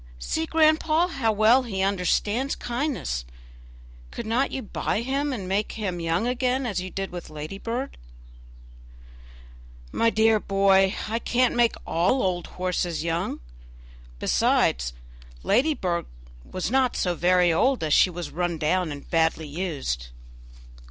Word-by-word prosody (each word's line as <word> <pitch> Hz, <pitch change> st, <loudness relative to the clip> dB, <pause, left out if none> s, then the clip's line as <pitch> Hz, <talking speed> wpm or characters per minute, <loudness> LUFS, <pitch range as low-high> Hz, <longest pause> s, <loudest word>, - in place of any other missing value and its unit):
see, 320 Hz, -, -2 dB
grandpapa, 315 Hz, +2 st, +3 dB
how 225 Hz, -7 st, +1 dB
well 220 Hz, +5 st, +5 dB
he 195 Hz, -6 st, -3 dB
understands 205 Hz, +7 st, 0 dB
kindness. 240 Hz, -, -3 dB, 0.9 s
Could -, -, -6 dB
not 235 Hz, +5 st, +1 dB
you 265 Hz, -, -4 dB
buy 210 Hz, +1 st, -2 dB
him 275 Hz, +4 st, -1 dB
and 200 Hz, -8 st, -4 dB
make 200 Hz, +3 st, -1 dB
him 190 Hz, -5 st, -3 dB
young 165 Hz, +5 st, 0 dB
again 250 Hz, +1 st, 0 dB
as 200 Hz, -6 st, -2 dB
you 185 Hz, -, -5 dB
did 195 Hz, +1 st, -4 dB
with 175 Hz, -1 st, -7 dB
Ladybird?" 195 Hz, -, -5 dB, 2.0 s
"My 230 Hz, -, +2 dB
dear 220 Hz, -1 st, +3 dB
boy, 195 Hz, 0 st, +3 dB
I 225 Hz, +2 st, -1 dB
can't 250 Hz, +1 st, +1 dB
make 240 Hz, -1 st, +3 dB
all 180 Hz, +11 st, +1 dB
old 180 Hz, -2 st, -1 dB
horses 180 Hz, -3 st, -2 dB
young; 165 Hz, -, -2 dB, 0.8 s
besides, -, -, +1 dB, 0.5 s
Ladybird 215 Hz, -, +1 dB, 0.4 s
was 185 Hz, +4 st, -3 dB
not 260 Hz, -2 st, +2 dB
so 180 Hz, -, 0 dB
very 175 Hz, 0 st, +3 dB
old, 255 Hz, +6 st, +2 dB
as 155 Hz, -2 st, +1 dB
she -, -, +6 dB
was 175 Hz, -1 st, -6 dB
run 175 Hz, 0 st, -2 dB
down 165 Hz, +2 st, 0 dB
and 145 Hz, -1 st, -8 dB
badly 160 Hz, -2 st, +1 dB
used." 145 Hz, -, -3 dB
195 Hz, 135 wpm, -25 LUFS, 175-245 Hz, 2.0 s, she